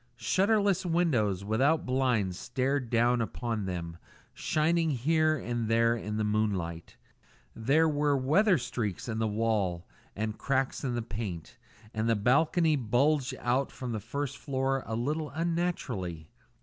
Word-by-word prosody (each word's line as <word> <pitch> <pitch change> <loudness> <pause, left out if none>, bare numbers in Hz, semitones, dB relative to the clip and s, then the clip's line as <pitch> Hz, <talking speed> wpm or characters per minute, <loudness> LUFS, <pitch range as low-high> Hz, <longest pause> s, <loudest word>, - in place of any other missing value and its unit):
Shutterless 200 - +2
windows, 125 - +1
without 135 +9 +2
blinds, 125 -8 +1
stared 130 +1 -1
down 120 +1 +3
upon 115 -2 -3
them, 85 -2 -5 0.4
shining 165 +1 +1
here 155 +4 +2
and 120 -3 -3
there 115 +1 +3
in 105 -2 -4
the 110 - 0
moonlight. 100 -6 -2 0.6
There 140 +8 +3
were 145 -2 +2
weather 175 +9 +3
streaks 110 -7 -3
in 110 -2 -3
the 110 - +1
wall 105 -5 0 0.3
and 110 +1 -3
cracks 135 0 -1
in 125 -3 -1
the 120 - -2
paint, 100 -7 -6 0.3
and 110 +1 -1
the 115 - +4
balcony 155 - +3
bulged 135 +2 +1
out 130 +3 0
from 125 -2 -6
the 110 - -2
first 140 +5 -4
floor 135 -1 -1
a 110 - -2
little 150 +6 -2
unnaturally. 140 - -3
125 Hz, 140 wpm, -29 LUFS, 110-150 Hz, 0.6 s, the